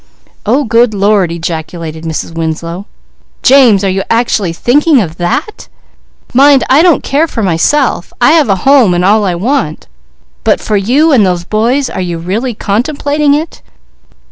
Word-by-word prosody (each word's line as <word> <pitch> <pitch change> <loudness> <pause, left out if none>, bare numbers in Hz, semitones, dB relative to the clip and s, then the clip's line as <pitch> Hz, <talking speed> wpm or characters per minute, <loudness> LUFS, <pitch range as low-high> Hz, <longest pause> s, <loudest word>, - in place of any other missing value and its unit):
"Oh 260 +7 +2
good 230 -2 +1
Lord!" 200 -3 +1
ejaculated 165 -1 -6
Mrs. 160 +1 -5
Winslow. 165 +4 -5 0.6
"James, 245 -7 +4
are 195 - +1
you 190 +1 -1
actually 225 -6 0
thinking 280 - +2
of 170 -6 -4
that? 175 - -3 0.7
Mind, 275 +1 +4
I 280 +4 +5
don't 345 -3 +2
care 300 +4 0
for 230 -7 -4
myself. 190 - 0
I - - +4
have 310 -7 +3
a 195 - +3
home 265 -10 +4
and 175 +1 0
all 210 +2 +3
I 180 -2 -1
want. 220 - -2 0.6
But - - +1
for 215 - -3
you 260 +11 +2
and 250 -7 +4
those 180 -2 -1
boys, 235 +8 0
are - - -5
you 175 -2 -4
really 210 +9 -3
contemplating 285 +7 -1
it?" 310 +2 -5
215 Hz, 160 wpm, -10 LUFS, 175-275 Hz, 0.7 s, I